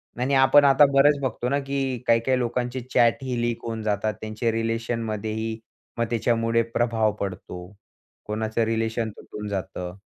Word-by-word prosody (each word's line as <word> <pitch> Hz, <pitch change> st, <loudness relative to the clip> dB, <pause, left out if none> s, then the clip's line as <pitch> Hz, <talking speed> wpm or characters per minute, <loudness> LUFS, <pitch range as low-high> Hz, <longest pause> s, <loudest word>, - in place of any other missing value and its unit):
नाही, 125 Hz, +2 st, -1 dB
नाही, 140 Hz, -, +2 dB
आपण 140 Hz, +2 st, +6 dB
आता 140 Hz, +1 st, +7 dB
बरेच 140 Hz, +1 st, +5 dB
बघतो 125 Hz, -1 st, -2 dB
ना, 140 Hz, +1 st, +1 dB
की 135 Hz, -2 st, -2 dB
काही 115 Hz, 0 st, +5 dB
काही 130 Hz, +2 st, +1 dB
लोकांचे 125 Hz, +1 st, -2 dB
चॅटही 120 Hz, +1 st, +2 dB
लीक 120 Hz, -1 st, -2 dB
होऊन 115 Hz, -1 st, -4 dB
जातात. 105 Hz, 0 st, 0 dB
त्यांचे 110 Hz, +2 st, -2 dB
रिलेशनमध्येही 115 Hz, -1 st, -2 dB, 0.4 s
मग 115 Hz, -, +1 dB
त्याच्यामुळे 115 Hz, 0 st, +1 dB
प्रभाव 115 Hz, -2 st, +2 dB
पडतो. 90 Hz, -2 st, -6 dB, 0.6 s
कोणाचं 110 Hz, +1 st, -1 dB
रिलेशन 115 Hz, 0 st, -1 dB
तुटून 105 Hz, 0 st, -8 dB
जातं. 90 Hz, -2 st, -5 dB
115 Hz, 150 wpm, -24 LUFS, 110-125 Hz, 0.6 s, आता